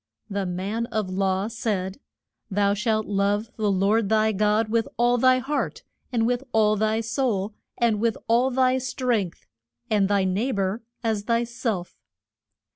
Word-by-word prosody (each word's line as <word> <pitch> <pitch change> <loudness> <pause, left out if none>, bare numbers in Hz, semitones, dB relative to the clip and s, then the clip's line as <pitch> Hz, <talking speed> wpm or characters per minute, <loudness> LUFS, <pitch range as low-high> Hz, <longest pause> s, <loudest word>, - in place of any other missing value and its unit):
The 195 -1 -1
man 200 +6 -2
of 215 -5 -2
law 190 +1 0
said, 205 -4 -3 0.5
Thou 200 0 +2
shalt 215 +1 0
love 205 +2 0
the 215 -2 0
Lord 200 +2 +2
thy 220 0 +3
God 210 +2 +2
with 225 0 +1
all 240 +1 +3
thy 255 +1 +5
heart, 270 +3 -2 0.3
and 230 -2 +1
with 245 +2 0
all 215 -1 +4
thy 220 +1 +1
soul, 225 -3 -1 0.2
and 230 -3 +2
with 230 0 +1
all 240 +3 +3
thy 260 0 +2
strength, 245 -8 -2 0.5
and 205 -2 +3
thy 200 -1 +3
neigh 200 +8 0
bor 195 +3 -1 0.2
as 220 -3 -1
thy 235 0 +2
self. 230 -6 -4
215 Hz, 155 wpm, -25 LUFS, 200-235 Hz, 0.5 s, thy